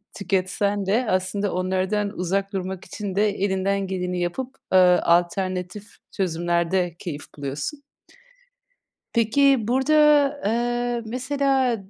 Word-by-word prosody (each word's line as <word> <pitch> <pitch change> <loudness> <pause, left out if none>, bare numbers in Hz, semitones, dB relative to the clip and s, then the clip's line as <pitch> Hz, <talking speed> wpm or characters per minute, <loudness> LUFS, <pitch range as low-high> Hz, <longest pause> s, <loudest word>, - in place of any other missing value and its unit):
tüketsen 200 +1 -1
de 225 +5 +1
aslında 190 +2 -1
onlardan 190 +3 -1
uzak 195 +3 -1
durmak 190 -1 -4
için 205 -3 -6
de 210 +2 +3
elinden 195 0 -1
geleni 180 -1 -3
yapıp, 250 +10 -3 0.2
ııı, 180 -1 +5
alternatif 180 +3 0 0.2
çözümlerde 175 -1 0
keyif 150 -4 -6
buluyorsun. 145 - -5 1.3
Peki 235 +1 +3
burada, 265 +4 +1 0.5
ııı, 240 +1 0
mesela 260 0 0
195 Hz, 100 wpm, -23 LUFS, 180-230 Hz, 1.3 s, ııı